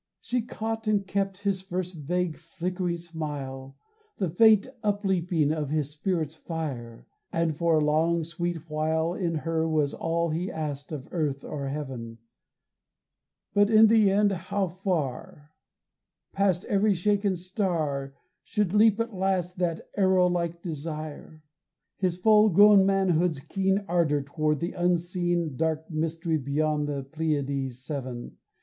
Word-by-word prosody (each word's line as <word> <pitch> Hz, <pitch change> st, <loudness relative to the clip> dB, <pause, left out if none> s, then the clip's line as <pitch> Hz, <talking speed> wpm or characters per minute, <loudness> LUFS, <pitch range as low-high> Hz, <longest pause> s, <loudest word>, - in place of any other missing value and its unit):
She 245 Hz, 0 st, -1 dB
caught 225 Hz, 0 st, -4 dB
and 205 Hz, -2 st, +2 dB
kept 195 Hz, 0 st, -2 dB
his 195 Hz, -2 st, 0 dB
first 185 Hz, -1 st, -4 dB
vague 170 Hz, +2 st, -2 dB
flickering 175 Hz, +1 st, -3 dB
smile, 145 Hz, -5 st, -6 dB, 0.4 s
The 185 Hz, -5 st, -1 dB
faint 215 Hz, +3 st, +6 dB, 0.2 s
upleaping 180 Hz, -7 st, +1 dB
of 150 Hz, -3 st, -3 dB
his 150 Hz, -1 st, -1 dB
spirit's 155 Hz, -1 st, -2 dB
fire; 145 Hz, -8 st, -6 dB, 0.3 s
And 165 Hz, -2 st, 0 dB
for 170 Hz, +1 st, +2 dB
a 150 Hz, -, +2 dB
long 165 Hz, +2 st, +2 dB
sweet 170 Hz, 0 st, -4 dB
while 160 Hz, +2 st, 0 dB
In 175 Hz, -3 st, -1 dB
her 160 Hz, +1 st, -1 dB
was 150 Hz, -2 st, +1 dB
all 165 Hz, 0 st, -1 dB
he 175 Hz, +4 st, -2 dB
asked 145 Hz, -2 st, -5 dB
of 145 Hz, -3 st, -6 dB
earth 150 Hz, -5 st, -2 dB
or 140 Hz, -2 st, -4 dB
heaven 130 Hz, -5 st, -5 dB, 1.4 s
But 205 Hz, 0 st, +4 dB
in 220 Hz, 0 st, +7 dB
the 220 Hz, -3 st, +5 dB
end 200 Hz, +1 st, +3 dB
how 190 Hz, +1 st, -2 dB
far, 155 Hz, -5 st, -3 dB, 0.8 s
Past 195 Hz, -2 st, +1 dB
every 205 Hz, 0 st, +2 dB
shaken 200 Hz, +1 st, +1 dB
star, 165 Hz, -7 st, -2 dB, 0.3 s
Should 205 Hz, -3 st, -1 dB
leap 215 Hz, 0 st, +5 dB
at 230 Hz, 0 st, -2 dB
last 185 Hz, -1 st, -1 dB
that 170 Hz, -2 st, -1 dB
arrow 190 Hz, -2 st, +4 dB
like 170 Hz, -1 st, -1 dB
desire, 155 Hz, -1 st, -6 dB, 0.5 s
His 180 Hz, -2 st, 0 dB
full 215 Hz, +2 st, +5 dB
grown 200 Hz, +1 st, +7 dB
manhood's 180 Hz, -5 st, +2 dB
keen 195 Hz, +6 st, 0 dB
Ardor 165 Hz, -4 st, +2 dB
toward 150 Hz, +1 st, -1 dB
the 170 Hz, -, -1 dB
unseen 175 Hz, -2 st, 0 dB
Dark 160 Hz, +2 st, -1 dB
mystery 160 Hz, +1 st, -1 dB
beyond 150 Hz, +2 st, 0 dB
the 140 Hz, -2 st, -3 dB
Pleiads 140 Hz, -3 st, -2 dB
seven. 130 Hz, -4 st, -5 dB
170 Hz, 135 wpm, -27 LUFS, 150-190 Hz, 1.4 s, in